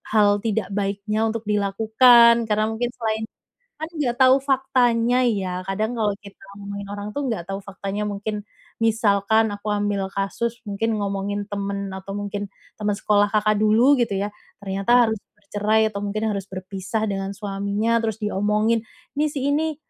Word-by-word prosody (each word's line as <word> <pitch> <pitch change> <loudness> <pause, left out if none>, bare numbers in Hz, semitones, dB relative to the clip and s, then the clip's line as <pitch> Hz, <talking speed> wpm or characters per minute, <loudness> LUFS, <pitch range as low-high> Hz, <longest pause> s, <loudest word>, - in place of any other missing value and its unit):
hal 205 -1 +5
tidak 215 -2 -2
baiknya 205 +2 -1
untuk 225 0 -3
dilakukan, 225 +3 +5
karena 215 0 +1
mungkin 235 +2 -1
selain 220 -2 -2 0.5
kan 315 +2 -6
nggak 290 -8 -1
tau 260 +1 +5
faktanya 255 -3 +2
ya, 190 -5 -1
kadang 215 +4 -1
kalo 210 -2 +1
kita 200 -1 -13 0.2
ngomongin 200 0 -7
orang 205 +1 -6
tuh, 285 +3 -3
nggak 225 -8 -2
tau 195 - -3
faktanya, 200 +1 -4
mungkin 210 +1 -3 0.4
misalkan 220 -1 +2
aku 205 +1 -7
ambil 205 -2 0
kasus, 220 +5 -3
mungkin 220 +1 -1
ngomongin 200 0 -2
temen 200 -1 -3
atau 190 +1 -7
mungkin 205 0 -4 0.3
temen 210 -1 0
sekolah 205 0 +2
Kakak 215 0 +1
dulu, 230 +6 +4
gitu 230 -4 +1
ya, 200 +2 -2 0.3
ternyata 195 +3 -2 0.2
harus 220 -1 -2 0.2
bercerai 210 +1 +1
atau 200 - -4
mungkin 205 +1 -3
harus 200 -1 -4
berpisah 190 +3 -4
dengan 195 -2 -3
suaminya, 205 +3 -1
terus 225 -2 -1
diomongin, 210 +2 +1 0.3
"Ini, 295 +1 0
si 290 -1 -4
ini 310 +1 0
210 Hz, 155 wpm, -23 LUFS, 200-225 Hz, 0.5 s, hal